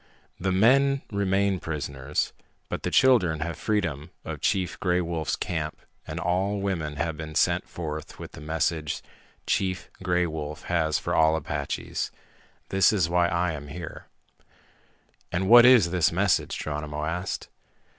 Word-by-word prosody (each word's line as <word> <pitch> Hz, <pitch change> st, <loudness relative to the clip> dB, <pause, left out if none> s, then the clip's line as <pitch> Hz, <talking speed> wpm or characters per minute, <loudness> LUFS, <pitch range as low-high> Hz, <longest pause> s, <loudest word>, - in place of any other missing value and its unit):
"The 95 Hz, +1 st, 0 dB
men 135 Hz, +8 st, +4 dB
remain 100 Hz, -1 st, +1 dB
prisoners. 70 Hz, -3 st, -3 dB, 0.4 s
But -, -, -3 dB
the -, -, -1 dB
children 90 Hz, -13 st, +4 dB
have 85 Hz, 0 st, -2 dB
freedom 80 Hz, -7 st, -1 dB, 0.2 s
of -, -, -6 dB
Chief 95 Hz, -3 st, 0 dB
Gray 90 Hz, -1 st, +2 dB
Wolf's 85 Hz, -3 st, -1 dB
camp -, -, -3 dB, 0.3 s
and -, -, -4 dB
all 95 Hz, +3 st, 0 dB
women 85 Hz, -7 st, -2 dB
have 80 Hz, +2 st, -2 dB
been 80 Hz, 0 st, -7 dB
sent -, -, +2 dB
forth 80 Hz, -2 st, -6 dB
with -, -, -9 dB
the -, -, -11 dB
message 80 Hz, 0 st, -1 dB, 0.4 s
Chief 95 Hz, 0 st, -1 dB
Gray 90 Hz, -1 st, +1 dB
Wolf 75 Hz, -1 st, -5 dB
has 80 Hz, -3 st, +1 dB
for -, -, -3 dB
all 80 Hz, 0 st, +4 dB
Apaches. 80 Hz, -, -3 dB, 0.6 s
That 95 Hz, -2 st, +4 dB
is 95 Hz, -7 st, +1 dB
why 85 Hz, 0 st, +3 dB
I 85 Hz, +1 st, 0 dB
am 75 Hz, -2 st, -7 dB
here." 85 Hz, +3 st, -8 dB, 1.2 s
"And 95 Hz, +2 st, 0 dB
what 120 Hz, +3 st, +9 dB
is 115 Hz, -10 st, +6 dB
this 90 Hz, -3 st, +3 dB
message?" 90 Hz, 0 st, +1 dB
Geronimo 75 Hz, 0 st, -4 dB
asked. 90 Hz, +3 st, -3 dB
85 Hz, 145 wpm, -26 LUFS, 80-95 Hz, 1.2 s, what